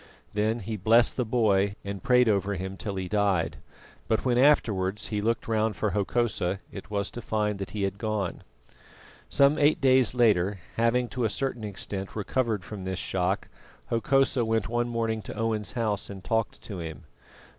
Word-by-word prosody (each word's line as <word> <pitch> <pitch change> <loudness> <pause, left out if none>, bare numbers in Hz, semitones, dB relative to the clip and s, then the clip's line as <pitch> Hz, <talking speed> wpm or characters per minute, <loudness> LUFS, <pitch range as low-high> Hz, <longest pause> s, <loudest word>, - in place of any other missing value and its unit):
Then 110 +3 0
he 110 -1 -4
blessed 115 +5 +4
the 125 - 0
boy 100 -4 +2
and 100 -1 -5
prayed 125 +2 +4
over 100 -1 +1
him 95 +1 -5
till 100 +1 -5
he 95 -1 -3
died; 100 -4 +1 0.5
but 110 +3 0
when 125 -2 +3
afterwards 105 -8 +2
he 105 -2 -1
looked 115 +1 0
round 110 -1 +1
for 105 +2 -1
Hokosa, 100 -3 0
it 100 - -9
was 100 -2 -2
to 120 - -6
find 105 -2 -1
that 95 - -4
he 105 -2 -3
had 100 +1 -2
gone. 105 -4 -2 0.9
Some 140 +2 +4
eight 150 +1 +4
days 130 -3 +4
later, 105 -5 +3 0.2
having 120 +2 +2
to 125 - -3
a 110 - +2
certain 125 0 -3
extent 100 -1 -5
recovered 110 -1 -1
from 105 -3 -7
this 95 0 -3
shock, 95 +1 -1 0.4
Hokosa 130 +2 +2
went 110 -1 0
one 120 +1 0
morning 115 -2 -1
to - - -8
Owen's 110 -2 -1
house 110 -4 -1
and 95 -2 -8
talked 115 +2 -1
to 100 -5 -6
him. 80 -4 -7
110 Hz, 175 wpm, -27 LUFS, 100-115 Hz, 0.9 s, blessed